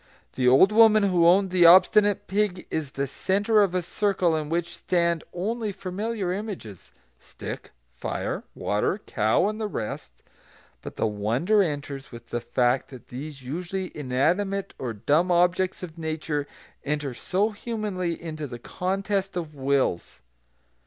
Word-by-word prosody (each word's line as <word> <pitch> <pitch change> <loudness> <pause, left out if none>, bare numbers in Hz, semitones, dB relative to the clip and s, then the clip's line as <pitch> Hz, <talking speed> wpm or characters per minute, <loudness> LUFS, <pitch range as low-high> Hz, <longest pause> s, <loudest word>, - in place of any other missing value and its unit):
The 125 -1 +1
old 135 +11 +6
woman 215 -1 +6
who 180 -4 +4
owned 190 +2 +4
the 175 -2 +6
obstinate 205 +3 +6
pig 195 -2 -1
is 150 -4 -3
the 140 - -1
centre 205 - +1
of 190 -3 +1
a 180 - 0
circle 185 -3 +1
in 155 -1 -3
which 170 +1 -2
stand 170 -2 0
only 215 +4 -2
familiar 195 0 -3
images, 190 - -7 0.3
stick, - - -8 0.2
fire, - - -4
water, 105 - 0
cow, 110 - +2
and 215 +1 -3
the 215 - -1
rest; 110 - -6 0.6
but - - -8
the - - 0
wonder 115 - +1
enters 145 -5 -3
with 120 0 -11
the 120 - -2
fact 125 +2 +1
that 130 -3 -13
these 135 +2 -8
usually 180 +7 -4
inanimate 175 +9 0
or 125 -3 -3
dumb 145 - +1
objects 180 +2 +2
of 165 -2 -8
nature 155 -2 -3 0.4
enter 145 -2 -2
so 195 - 0
humanly 205 -6 -3
into 155 -3 -6
the 120 - -7
contest 195 - -2
of 160 -3 -4
wills. 130 - -1
175 Hz, 145 wpm, -25 LUFS, 140-195 Hz, 0.6 s, old